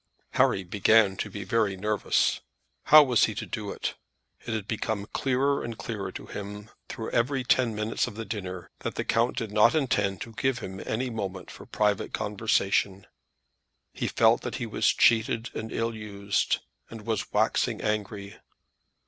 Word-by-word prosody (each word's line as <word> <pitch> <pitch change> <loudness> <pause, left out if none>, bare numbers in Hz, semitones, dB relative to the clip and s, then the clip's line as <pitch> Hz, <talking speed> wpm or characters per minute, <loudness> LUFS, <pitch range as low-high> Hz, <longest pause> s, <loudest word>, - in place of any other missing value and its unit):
Harry 95 - +3
began 100 +2 +4
to 105 - -4
be 100 0 -6
very 100 0 +1
nervous. 105 +1 +1 0.5
How 155 0 +9
was 125 -5 +4
he 110 - -4
to - - -4
do 105 -3 -5
it? - - -3 0.5
It 115 - -1
had 110 -2 -4
become 110 -2 -2
clearer 135 +4 0
and 115 -2 -5
clearer 100 -4 -5
to - - -8
him 105 +1 -8 0.2
through 110 - -5
every 130 +3 +1
ten 125 -2 +2
minutes 110 +2 -1
of - - -8
the 115 +1 -5
dinner, 95 -6 -6
that - - -4
the - - -1
count 115 +1 +1
did 115 -4 -3
not 105 +6 +5
intend 110 - +1
to 115 - -7
give 135 0 0
him 95 -5 -7
any 125 +3 -1
moment 95 -4 -5
for - - -12
private 105 -2 0
conversation. 100 -2 0 0.9
He - - -2
felt - - +4
that - - -4
he - - -3
was - - 0
cheated 115 -1 +2
and 110 0 -5
ill 115 0 -1
used, 100 -2 -1 0.3
and 110 -2 -10
was 110 -3 -2
waxing - - +1
angry. 105 -1 -3
110 Hz, 170 wpm, -27 LUFS, 100-115 Hz, 0.9 s, How